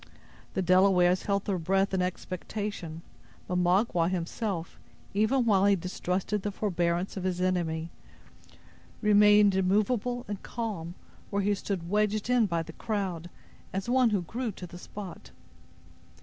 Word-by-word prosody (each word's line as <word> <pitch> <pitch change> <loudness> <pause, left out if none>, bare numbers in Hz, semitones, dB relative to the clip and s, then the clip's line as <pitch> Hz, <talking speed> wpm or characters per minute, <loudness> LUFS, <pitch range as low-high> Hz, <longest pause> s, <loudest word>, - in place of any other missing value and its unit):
The 190 - +1
Delawares 185 0 +4
held 200 -1 +1
their 190 -3 -1
breath 195 +4 +1
in 190 - +1
expectation; 180 -1 -4 0.4
but 180 0 0
Magua 180 -1 +2
himself, 180 0 -3 0.3
even 225 +5 +2
while 200 -3 +4
he 200 - +5
distrusted 185 +3 -2
the 205 - -2
forbearance 175 -2 -1
of 185 - -3
his 185 -1 -1
enemy, 170 -3 -1 1.1
remained 210 -1 +6
immovable 215 +6 +1
and 205 -2 -5
calm, 195 -8 -5 0.3
where 200 0 0
he 205 +1 +2
stood 190 -3 -3
wedged 210 +3 +1
in 240 -4 +4
by 170 -2 -1
the 165 - -10
crowd, 185 -6 -3 0.4
as 195 +2 -3
one 250 -1 +4
who 200 -4 0
grew 235 +6 -3
to 180 - -8
the 175 0 -10
spot. 180 - -9
190 Hz, 140 wpm, -29 LUFS, 180-210 Hz, 1.1 s, remained